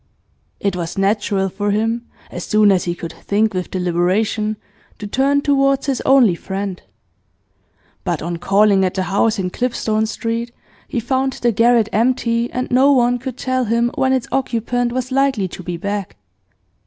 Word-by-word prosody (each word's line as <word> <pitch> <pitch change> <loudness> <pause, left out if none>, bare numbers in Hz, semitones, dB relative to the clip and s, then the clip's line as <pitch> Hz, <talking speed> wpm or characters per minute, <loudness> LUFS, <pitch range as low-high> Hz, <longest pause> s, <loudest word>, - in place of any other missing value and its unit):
It 200 -2 -1
was 170 0 -4
natural 195 -1 +1
for 205 +2 -3
him, 225 +3 -1 0.2
as 175 - -5
soon 215 -1 +4
as 185 -2 +1
he 175 -1 -2
could 165 -1 -7
think 210 +1 0
with 180 -1 -3
deliberation, 190 +4 0 0.4
to 210 - -7
turn 275 +6 +1
towards 275 -1 +2
his 275 -4 -1
only 260 -8 +6
friend. 190 +1 -5 1.2
But 175 -4 -1
on 170 +1 -3
calling 195 +2 +3
at 185 - -1
the 190 - 0
house 210 +4 +1
in 180 -2 -2
Clipstone 220 -2 -1
Street 230 +2 -3 0.4
he 245 - -2
found 260 +3 0
the 240 -1 0
garret 230 0 +3
empty, 235 0 +1
and 255 +1 -3
no 265 +3 +5
one 245 -2 +3
could 260 0 -6
tell 255 -1 -1
him 235 +2 +1
when 265 0 +1
its 260 -2 0
occupant 245 -2 -1
was 255 +1 -3
likely 265 -7 +1
to 185 - -9
be 175 -1 -5
back. 200 +2 -4
220 Hz, 165 wpm, -19 LUFS, 195-250 Hz, 1.2 s, only